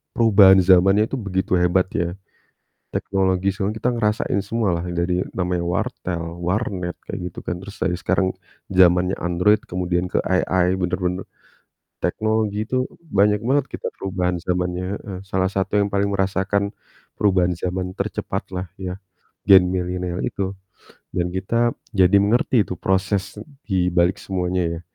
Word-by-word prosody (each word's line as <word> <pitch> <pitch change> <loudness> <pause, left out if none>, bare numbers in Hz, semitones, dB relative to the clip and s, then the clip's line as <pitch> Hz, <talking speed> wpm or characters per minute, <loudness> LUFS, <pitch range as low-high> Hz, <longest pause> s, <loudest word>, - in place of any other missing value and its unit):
perubahan 100 -4 +7
zamannya 95 +3 +6
itu 135 - -1
begitu 100 0 -2
hebat 90 +1 +2
ya. 85 -4 -2 0.8
Teknologi 95 -1 0
soalnya 105 +3 -3
kita 125 - +2
ngerasain 105 -3 0
semua 105 -4 0
lah 85 - -4
yang 90 - -4
dari 90 +1 0 0.2
namanya 90 -1 -1
wartel, 85 -1 -3
warnet, 90 0 -2 0.2
kayak - - -4
gitu - - -8
kan. 90 - -4
Terus 100 - -9
dari 90 -1 0
sekarang 95 +1 +1 0.4
zamannya 90 0 +4
Android 90 +4 +2
kemudian 90 0 -1
ke 90 - 0
AI, 95 0 +1
bener-bener 90 0 -2 0.7
teknologi 110 +2 0
itu 130 +3 -1 0.2
banyak 105 +1 +3
banget 135 +3 +1
kita - - -4
perubahan 90 -2 -2
zamannya, 90 +1 -2 0.2
heeh. 95 -3 -7
Salah 95 0 0
satu 95 0 -2
yang 100 - -1
paling 100 0 +1
merasakan 95 +1 0 0.5
perubahan 95 -3 +3
zaman 90 +1 -2
tercepat - - -3
lah 90 +1 -3
ya, 90 -1 -4 0.5
Gen 95 -2 +7
Milenial 90 -1 -2
itu. 95 -1 -2 0.6
Dan 90 0 -2
kita 115 +6 +1 0.2
jadi 95 -4 +3
mengerti 115 +3 +3
itu 90 - -4
proses 95 +3 -1 0.2
di 95 -4 +1
balik 90 +1 +2
semuanya 90 -1 -1 0.2
ya. - - -10
95 Hz, 145 wpm, -22 LUFS, 90-100 Hz, 0.8 s, perubahan